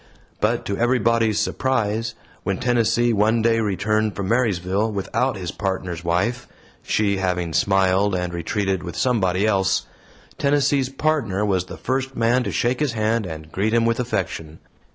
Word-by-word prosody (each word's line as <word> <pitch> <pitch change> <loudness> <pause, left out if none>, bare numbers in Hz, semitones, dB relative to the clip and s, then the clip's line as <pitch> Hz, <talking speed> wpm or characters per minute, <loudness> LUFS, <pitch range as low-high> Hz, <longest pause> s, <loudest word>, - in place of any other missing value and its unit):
But - - 0
to 100 - -2
everybody's 115 -2 +2
surprise, 115 -3 -1 0.3
when 95 0 -2
Tennessee 120 -1 +2
one 110 +2 +2
day 115 0 +3
returned 105 0 0
from 100 -1 -3
Marysville, 105 -3 +1
without 105 +5 -1
his 90 -3 -4
Partner's 95 -4 -3
wife 100 +9 0 0.3
she 100 -2 +1
having 90 -3 -1
smiled 95 +2 +2
and 90 -1 -2
retreated 95 +2 -1
with 85 -2 -7
somebody 100 -6 +1
else 95 -2 +1 0.5
Tennessee's 140 -2 +2
Partner 135 -9 0
was 95 -3 0
the - - -9
first 130 0 -2
man 115 +2 +2
to - - -2
shake 125 +1 0
his 150 -5 0
hand 110 -1 0
and 80 -1 -8
greet 105 +6 0
him 115 0 +3
with 115 +1 +1
affection. 95 -9 -3
105 Hz, 155 wpm, -22 LUFS, 95-115 Hz, 0.5 s, day